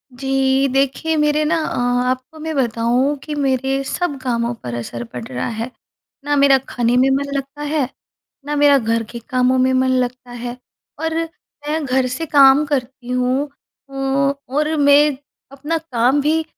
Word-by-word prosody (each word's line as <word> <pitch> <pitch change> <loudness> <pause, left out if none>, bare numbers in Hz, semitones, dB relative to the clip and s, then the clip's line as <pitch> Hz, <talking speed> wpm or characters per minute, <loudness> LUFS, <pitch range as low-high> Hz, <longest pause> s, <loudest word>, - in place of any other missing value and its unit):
जी, 270 +1 +1
देखिए, 275 +4 +1
मेरे 300 0 +2
ना 320 +2 +2
अ, 315 - -2 0.3
आपको 260 +5 -4
मैं 320 +1 -4
बताऊँ 245 +2 +1
कि 300 - -5
मेरे 270 -1 0
सब 310 +1 -2
कामों 235 -2 -1
पर 120 - -5
असर 120 0 -5
पड़ 120 0 -8
रहा 125 -1 -3
है। 230 +2 -4 0.5
ना 290 0 +1
मेरा 280 -1 +5
खाने 240 0 +1
में 260 +2 +4
मन 280 +1 -2
लगता 275 +1 -5
है, 295 -3 -1 0.6
ना 295 0 -2
मेरा 290 -1 +5
घर 230 -2 0
के 235 - -6
कामों 255 -1 +2
में 255 0 +3
मन 260 0 +2
लगता 250 0 -7
है, 245 0 -6 0.4
और 320 0 -1 0.5
मैं 310 +1 -1
घर 260 -1 +1
से 255 +6 -3
काम 280 -1 +6
करती 260 -3 -3
हूँ 250 +2 +1 0.4
अ, - - -15
और 275 +2 0
मैं 285 0 +5 0.3
अपना 295 +4 -2
काम 270 -3 +1
भी 315 +3 +1
270 Hz, 165 wpm, -19 LUFS, 250-290 Hz, 0.6 s, काम